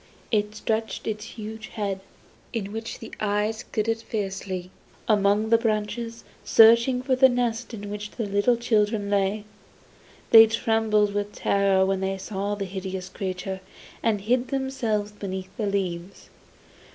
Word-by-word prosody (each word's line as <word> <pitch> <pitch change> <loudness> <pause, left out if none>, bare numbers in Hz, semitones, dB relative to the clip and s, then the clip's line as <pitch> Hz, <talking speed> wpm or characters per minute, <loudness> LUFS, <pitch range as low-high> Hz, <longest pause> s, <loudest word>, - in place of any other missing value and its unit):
It 210 -1 +1
stretched 220 0 -2
its 215 -1 -3
huge 220 -1 -8
head, 200 -3 -3 0.5
in 205 -4 -3
which 225 +1 -5
the 225 - -10
eyes 210 +2 0
glittered 225 +1 0
fiercely, 195 -4 -4 0.4
among 210 0 +3
the 230 0 +5
branches, 230 +1 -2 0.2
searching 235 +3 +6
for 260 0 +2
the 260 +1 +6
nest 245 -1 -1
in 205 -3 -7
which 205 0 -5
the 225 - -4
little 205 +4 +2
children 210 -3 +1
lay. 200 +1 +1 0.9
They 225 -1 +10
trembled 220 -2 +2
with 205 0 -2
terror 195 -1 +2
when 195 0 0
they 190 0 -1
saw 200 +1 -3
the 200 -1 -3
hideous 190 -1 -5
creature, 190 0 -4 0.4
and 215 -3 +1
hid 245 +4 +1
themselves 250 -7 -1
beneath 190 -2 -6
the 215 -4 -1
leaves. 190 -2 -3
210 Hz, 140 wpm, -25 LUFS, 200-225 Hz, 0.9 s, They